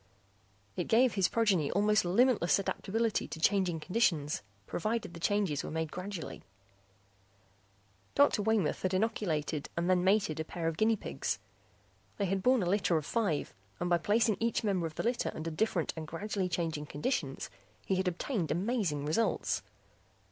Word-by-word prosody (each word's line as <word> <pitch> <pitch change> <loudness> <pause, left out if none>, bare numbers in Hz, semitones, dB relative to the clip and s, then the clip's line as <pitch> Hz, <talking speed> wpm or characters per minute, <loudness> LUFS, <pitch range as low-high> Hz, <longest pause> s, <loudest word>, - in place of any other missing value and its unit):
It - - -1
gave 240 +1 +4
his 195 -3 +3
progeny 195 -10 +2
almost 210 0 +3
limitless 200 0 +3
adaptability 220 +3 -1
to 160 - -7
changing 185 -2 +2
conditions, 165 -7 +1 0.2
provided 215 - -2
the 170 - -8
changes 195 -6 +1
were - - -5
made 160 -1 -2
gradually. 185 -1 -6 1.7
Dr. 285 -6 +4
Waymoth 210 -6 +1
had 185 0 0
inoculated 165 -8 -1
and 170 +1 0
then 180 -1 +3
mated 190 -5 +2
a - - 0
pair 165 +1 -4
of 165 - -1
guinea 220 +6 +3
pigs; 140 - -3 0.8
they 200 - 0
had 190 +1 0
borne 250 -1 +4
a - - -1
litter 185 -3 +2
of 155 - -3
five 200 -10 -1 0.3
and 175 0 -1
by 175 - +4
placing 215 +3 +2
each 230 0 0
member 190 -5 +1
of 155 - -11
the - - -2
litter 240 +1 0
under 165 +1 -4
different 175 0 0
and 160 -1 -6
gradually 190 +3 -2
changing 165 -4 -2
conditions, 145 - -2 0.3
he - - 0
had 190 0 0
obtained 180 - -1
amazing 180 - 0
results. 160 +10 0
185 Hz, 160 wpm, -32 LUFS, 160-215 Hz, 1.7 s, gave